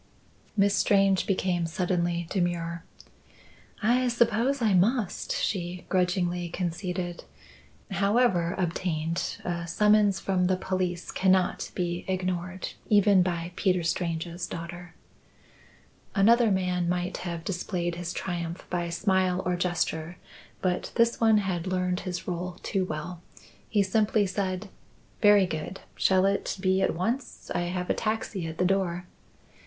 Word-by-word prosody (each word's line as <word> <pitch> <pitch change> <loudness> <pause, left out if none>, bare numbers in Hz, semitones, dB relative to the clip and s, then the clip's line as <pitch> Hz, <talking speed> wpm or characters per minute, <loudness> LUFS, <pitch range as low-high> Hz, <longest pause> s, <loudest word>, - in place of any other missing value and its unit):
Miss 200 0 +4
Strange 195 -2 +3
became 180 -3 0
suddenly 175 0 -1
demure. 170 -3 -1 1.0
"I 250 +3 +3
suppose 235 +3 +2
I 220 -4 +2
must," 205 +3 +1
she 180 -2 -2
grudgingly 180 -1 0
conceded. 175 0 -3 0.7
"However 195 -3 +2
obtained, 165 -2 -1
a 170 -1 -2
summons 210 +2 +4
from 185 -2 +1
the 185 - +2
police 185 -2 -2
cannot 185 -1 +2
be 175 -1 -2
ignored 185 0 -2 0.2
even 205 -2 +5
by 175 -1 -1
Peter 180 -3 +1
Strange's 170 0 -2
daughter." 175 0 -7 1.2
Another 230 +3 +5
man 180 -2 0
might 180 +1 -1
have 170 -2 -5
displayed 175 -2 -2
his 175 0 -4
triumph 170 -1 -4
by 175 -1 -1
smile 185 +1 +1
or 180 0 +1
gesture; 175 -1 -1 0.5
but 180 -1 0
this 235 0 +2
one 220 -1 +5
had 185 -3 -1
learned 180 0 0
his 180 -3 -5
role 180 0 -3
too 190 -2 0
well. 165 +1 -5 0.5
He 205 -3 +3
simply 210 +2 +2
said: 190 +1 -2 0.5
"Very 205 -2 +7
good. 170 +2 -5
Shall 190 0 +3
it 200 0 0
be 190 0 +2
at - - +1
once? 230 +9 -3
I 175 - 0
have 180 0 -3
a - - +3
taxi 215 -5 -2
at 160 0 -6
the 180 - +2
door." 180 -2 0
180 Hz, 130 wpm, -27 LUFS, 175-195 Hz, 1.2 s, Very